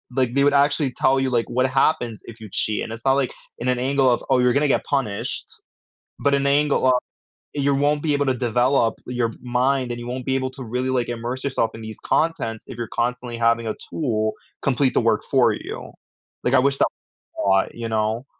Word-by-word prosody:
like, 130 -2 +1
they 140 - +4
would 145 - +4
actually 140 0 +3
tell 135 +2 +2
you, 135 - +1
like, 120 -1 0
what 130 +1 +2
happens 130 -4 +1
if 115 0 -11
you 110 - -9
cheat, 105 +1 0
and - - -6
it's 115 +2 -10
not, 135 - +5
like, 135 -2 +1 0.3
in 125 - -1
an 125 -1 +1
angle 135 0 +3
of, 120 - +1
"Oh, 130 - +4
you're 125 -1 +4
gonna 150 +1 +2
get - - +2
punished," 125 -8 -2 0.7
but 140 0 +2
an 140 0 +1
angle 145 -1 +3
of 130 - +6 0.6
you 140 0 +2
won't 145 +1 +1
be 150 -2 +1
able 145 0 +1
to 130 - +2
develop 120 0 +2
your 120 -2 -1
mind, 125 +1 +1
and 120 - -5
you 120 - -7
won't 125 +1 -4
be 135 - +1
able 130 0 -1
to 130 0 -9
really, 125 +3 -2
like, 125 -2 0
immerse 120 +2 -4
yourself 130 -5 0
in 115 - -8
these 110 -1 -8
contents 115 -9 0
if 120 - -9
you're 120 -2 -4
constantly 120 0 -2
having 115 0 +2
a 110 - -2 0.2
tool 110 -8 0 0.3
complete 135 0 +1
the - - +4
work 115 -2 +2
for - - +4
you, - - -7 0.5
like, 125 - +2
I - - +7
wish 140 +1 +1
tha - - +4 0.5
a - - 0
lot, 95 0 +3
you 115 -1 -5
know. 110 +3 -1
125 Hz, 225 wpm, -22 LUFS, 115-135 Hz, 0.7 s, I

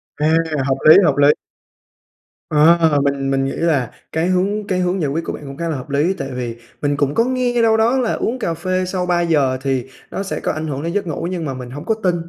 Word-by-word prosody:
À, 150 - 0 0.4
hợp 135 0 +1
lý, - - +10
hợp 150 -5 +2
lý! 145 0 +5 1.2
Ờ, 160 0 +4
mình 140 -1 0
mình 135 0 +1
nghĩ 135 - -2
là 145 -8 0 0.2
cái 160 +2 0
hướng 200 +3 0
cái 185 -1 0
hướng 180 +1 0
giải 145 - 0
quyết 165 +3 -2
của - - -3
bạn - - -8
cũng 135 0 -8
khá 170 +1 -3
là 160 - -1
hợp 130 +1 -7
lý, 145 +6 +1
tại 135 - -4
vì 120 -2 -4 0.3
mình 145 -1 0
cũng 145 0 0
có 230 - +4
nghe 250 -1 0
đâu 225 -1 +4
đó 230 +4 +3
là 250 -3 0
uống 255 +3 -2
cà 170 -8 -1
phê 185 +3 -1
sau 185 0 -2
3:00 165 -7 +1
thì 135 -2 -1 0.2
nó 195 - -3
sẽ 195 - -4
có - - -1
ảnh 155 +1 -4
hưởng 140 -1 -4
đến 170 +1 -3
giấc 205 -2 -1
ngủ 165 +1 -3
nhưng 175 -3 -3
mà 135 - -3
mình 125 -1 -8
hông 145 +5 -8
có 220 - +1
tin. 180 -2 +2
160 Hz, 255 wpm, -19 LUFS, 140-185 Hz, 1.2 s, lý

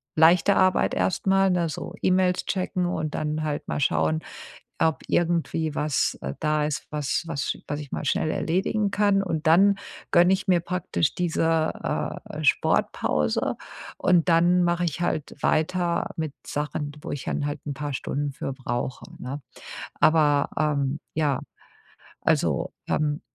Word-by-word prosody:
leichte 170 +5 +5
Arbeit 185 -1 +3
erst 185 - 0
mal, 195 0 +4
ne, 175 -2 +1
so - - -6
E-Mails 185 -1 +2
checken 185 -2 -1
und 155 -3 -2
dann 155 0 -2
halt 150 -1 -3
mal - - -2
schauen, 80 - +1 0.6
ob 160 -1 +1
irgendwie 165 -2 0
was, 150 -2 0
äh, 65 - -3
da 150 -1 +1
ist, 150 - -3
was 150 +2 -1
was 145 -4 -2
sch - - -3
was 145 - -2
ich 145 - -9
mal - - -3
schnell 155 - +1
erledigen 200 +4 0
kann. 200 -1 +3
Und 160 -5 -3
dann 195 +5 +6 0.4
gönne 175 0 +6
ich 190 +1 -1
mir 175 -2 +4
praktisch 180 -3 -1
diese, 165 -2 +1 0.5
äh, - - -9
äh, - - -5
Sportpause 75 -1 +1 0.4
und 175 -1 +3
dann 175 +2 +4
mache 175 0 +1
ich 165 -1 -2
halt 155 -4 -2
weiter 170 +2 +1
mit 155 -3 -3
Sachen, 145 0 -3
wo - - -6
ich 145 - -4
dann - - -2
halt 145 - -4
'n 140 - -3
paar 145 0 -4
Stunden 145 +2 -2
für 135 - -4
brauche, 125 -1 -4 0.2
ne? 135 +3 -5 0.6
Aber, 150 -3 +4
ähm, 145 -2 0 0.2
ja, 150 -4 +1 0.8
also, - - +1 0.2
ähm 150 -1 0
160 Hz, 155 wpm, -25 LUFS, 145-180 Hz, 0.8 s, dann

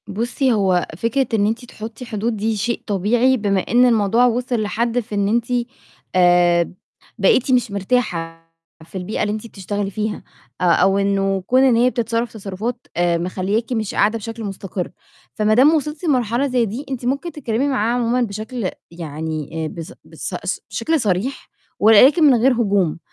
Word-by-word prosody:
بُصي، 240 +4 0
هو 190 -4 +1
فكرة 230 +6 0
إن 205 -2 +3
أنتِ 230 +3 -3
تحطي 225 +1 -9
حدود 225 0 -2
دي 220 +2 -1
شيء 235 +4 -2
طبيعي 230 +6 +2
بمِا 200 -3 +1
إن 245 +5 +3
الموضوع 230 0 +3
وصِل 245 -1 0
لحد 230 +3 -1
في 220 -2 -6
إن 200 -1 +1
أنتِ، 235 +2 0 0.7
آآ، 175 -1 +4 0.5
بقيتِ 270 - +3
مش 245 -4 +2
مرتاحة 190 -6 -2 0.4
في 190 - -8
البيئة 185 +4 -3
اللي 210 - 0
أنتِ 215 +1 -5
بتشتغلي 200 -1 -4
فيها، 210 +1 -3 0.4
أ - - 0
أو 185 +3 +4
إنه 195 -1 +1
كُون 255 +1 +4
إن 255 -3 +4
هي 245 +2 +4
بتتصرف 230 0 -2
تصرُفات، 220 +4 -5
آآ، 175 -1 +2
مخلياكِ 190 +7 -2
مش 220 -4 -2
قاعدة 215 +3 +2
بشكل 225 +1 -7
مُستقر. 195 -2 -5 0.4
فما 215 0 +2
دام 275 +7 +6
وصلتِ 300 +2 -2
لمرحلة 250 -3 +1
زي 250 -3 +1
دي، 230 +8 -5
أنتِ 255 -2 -4
ممكن 280 +7 -2
تتكلمي 265 -2 -1
معاها 235 -4 0
عمومًا 245 0 +1
بشكل 215 0 -4 0.2
يعني 160 -2 -5
إيه 160 -1 -3
بس 165 0 -8
بس - - -7 0.2
سش - - -2
شكل 320 -1 -1
صريح، 210 +5 -2 0.3
ولكن 255 - +6
من 280 -3 +7
غير 245 +3 +4
هجوم. 200 -9 +1
220 Hz, 170 wpm, -20 LUFS, 195-245 Hz, 0.7 s, من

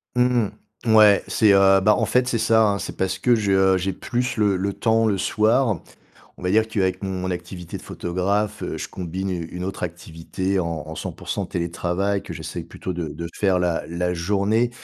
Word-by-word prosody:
Mmh 125 -3 +2 0.4
mh. 110 - +3
Ouais, 105 -2 +7
c'est, 105 -2 +4
heu, 95 0 +6
bah, 105 +2 +4
en - - +1
fait, 125 0 +2
c'est 120 -2 0
ça, 110 0 +3
hein. 100 - +1
C'est - - -6
parce 95 0 -1
que 120 +5 +3
je, 105 -3 0
heu, 95 0 +4
j'ai 95 +1 -2
plus 125 +6 -2
le 105 -4 +2
le 100 +2 -1
temps 115 -1 +2
le 100 -3 +1
soir. 110 +1 +2 0.6
On - - -13
va 90 - 0
dire 110 +3 +3
qu'avec 95 -4 -1
mon 95 -1 -3
activité 90 -1 -6
de - - -10
photographe, 100 +4 -2
je - - -5
combine 95 +2 -4
une 85 -3 -3
une 90 +1 -5
autre 95 - -5
activité 85 +2 -3
en 85 -4 -2
en 80 - -7
100% - - -4
télétravail 90 +3 -1
que - - -8
j'essaye - - -6
plutôt 95 - -6
de 85 -2 -3
de 85 +3 -6
faire 95 -3 +2
la 90 -2 0
la 90 +1 -1
journée 100 +7 +1
95 Hz, 200 wpm, -23 LUFS, 90-105 Hz, 0.6 s, Ouais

